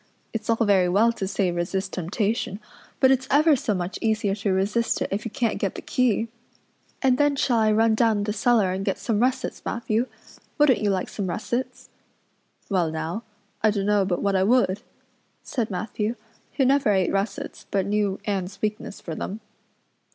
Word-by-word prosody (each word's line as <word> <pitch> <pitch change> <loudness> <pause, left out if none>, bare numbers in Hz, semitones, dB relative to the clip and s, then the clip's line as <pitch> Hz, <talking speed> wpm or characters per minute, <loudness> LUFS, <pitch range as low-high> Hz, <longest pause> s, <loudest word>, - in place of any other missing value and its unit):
It's 225 -1 -4
all 230 - +4
very 190 -3 +4
well 215 +6 +4
to 200 -4 -3
say 190 -2 0
resist 185 +2 -2
temptation, 200 +4 -1 0.4
but 260 - +6
it's 260 0 +1
ever 300 +2 +5
so 220 -5 -1
much 180 +1 -3
easier 215 -3 +1
to 200 0 -1
resist 205 +5 +1
it - - -1
if 200 +3 -2
you - - -2
can't 230 -1 -1
get 195 - -1
the - - -6
key. 230 -3 +1 0.8
And 260 -1 +3
then 290 -1 +3
shall 245 -4 +2
I 215 -1 +3
run 220 +1 +4
down 220 -2 +2
the 210 0 -1
cellar 220 -3 +3
and 190 +1 -2
get 195 - -1
some 220 -3 -1
russets, 255 +2 0
Matthew? 230 +1 -1 0.5
Wouldn't 295 -7 +4
you 210 - +2
like 190 -2 0
some 200 -3 -4
russets?" 235 +7 -3 0.8
"Well 180 -4 +1
now, 160 +6 -3 0.4
I 215 - +4
dunno 205 0 +2
but 180 -2 -1
what 200 -1 +1
I 190 - +3
would," 205 -2 +3 0.6
said 235 -4 -2
Matthew, 210 +4 -2 0.4
who 270 - +2
never 275 -2 +3
ate 190 -3 +2
russets 200 +2 -3
but 195 -2 0
knew 200 -1 0
Anne's 195 -1 -2
weakness 210 -1 -3
for 165 - -6
them. 195 +6 -5
210 Hz, 180 wpm, -24 LUFS, 195-230 Hz, 0.8 s, but